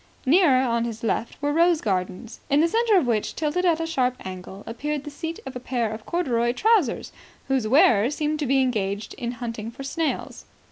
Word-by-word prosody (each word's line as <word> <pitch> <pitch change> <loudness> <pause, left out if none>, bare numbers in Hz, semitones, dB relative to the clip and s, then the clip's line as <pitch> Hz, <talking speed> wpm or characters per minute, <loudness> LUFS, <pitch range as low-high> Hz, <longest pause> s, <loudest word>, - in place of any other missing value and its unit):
Nearer, 275 -3 +5
on 235 -2 +1
his 230 -1 -5
left, 230 +1 -2
were 290 0 +1
rose 335 0 +4
gardens, 190 +2 -3
in 285 +1 +4
the 325 - +4
centre 450 +2 +3
of 340 - +3
which, 225 -3 -1
tilted 320 +4 -1
at 335 -2 +3
a 330 - -1
sharp 255 -6 0
angle, 190 +2 -8
appeared 290 +5 -3
the 295 - -7
seat 325 +3 -5
of 265 - -7
a - - -4
pair 240 -3 -2
of 215 0 -8
corduroy 240 -9 0
trousers, 410 - +2 0.4
whose 265 -5 +1
wearer 235 -3 +5
seemed 300 +1 -2
to 295 - -1
be 270 +1 +3
engaged 205 -4 -2
in 240 -1 -3
hunting 230 -2 -5
for 255 +4 -9
snails. 315 +3 -3
255 Hz, 200 wpm, -24 LUFS, 230-310 Hz, 0.4 s, Nearer